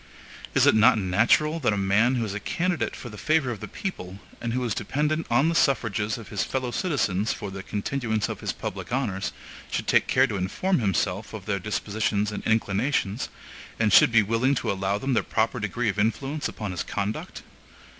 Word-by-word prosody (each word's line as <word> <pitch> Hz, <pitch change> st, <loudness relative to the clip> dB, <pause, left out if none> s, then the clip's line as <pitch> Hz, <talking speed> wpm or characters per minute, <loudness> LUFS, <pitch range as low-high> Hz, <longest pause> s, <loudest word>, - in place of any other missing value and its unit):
Is -, -, +5 dB
it -, -, +6 dB
not 110 Hz, +1 st, +6 dB
natural 115 Hz, -, +2 dB
that 120 Hz, -8 st, +2 dB
a -, -, -1 dB
man 105 Hz, +6 st, +3 dB
who 120 Hz, -2 st, 0 dB
is 100 Hz, -, -4 dB
a 100 Hz, -, -3 dB
candidate 175 Hz, -, -1 dB
for 120 Hz, -, -8 dB
the 105 Hz, -, -10 dB
favor 155 Hz, -5 st, +2 dB
of 110 Hz, -, -5 dB
the -, -, -6 dB
people, 95 Hz, -, -6 dB, 0.2 s
and 115 Hz, -, -2 dB
who 125 Hz, +2 st, -1 dB
is 115 Hz, -4 st, 0 dB
dependent 150 Hz, -, -1 dB
on 125 Hz, +6 st, +3 dB
the 165 Hz, -, +1 dB
suffrages 110 Hz, -8 st, +1 dB
of 115 Hz, -4 st, -10 dB
his -, -, -1 dB
fellow 130 Hz, -2 st, -2 dB
citizens 110 Hz, -, 0 dB
for 100 Hz, -, -6 dB
the 95 Hz, 0 st, -6 dB
continuance 110 Hz, +1 st, -2 dB
of -, -, -5 dB
his -, -, -2 dB
public -, -, -6 dB
honors, 105 Hz, -7 st, -1 dB, 0.4 s
should -, -, -2 dB
take -, -, +3 dB
care -, -, +4 dB
to 100 Hz, -, -3 dB
inform 160 Hz, -, 0 dB
himself 100 Hz, 0 st, -1 dB
of 100 Hz, -4 st, -8 dB
their 100 Hz, -2 st, -1 dB
dispositions 105 Hz, +1 st, -1 dB
and 105 Hz, -, -5 dB
inclinations, 110 Hz, +1 st, 0 dB, 0.5 s
and 105 Hz, -3 st, +2 dB
should -, -, +7 dB
be 115 Hz, -2 st, +5 dB
willing 115 Hz, +6 st, +1 dB
to -, -, -1 dB
allow 95 Hz, +1 st, -1 dB
them 135 Hz, +5 st, -1 dB
their -, -, +3 dB
proper 115 Hz, +2 st, 0 dB
degree 110 Hz, +2 st, -1 dB
of 105 Hz, -, -2 dB
influence 135 Hz, +8 st, 0 dB
upon 105 Hz, -3 st, -5 dB
his 90 Hz, -, -3 dB
conduct? 100 Hz, +1 st, -4 dB
110 Hz, 205 wpm, -26 LUFS, 100-130 Hz, 0.5 s, should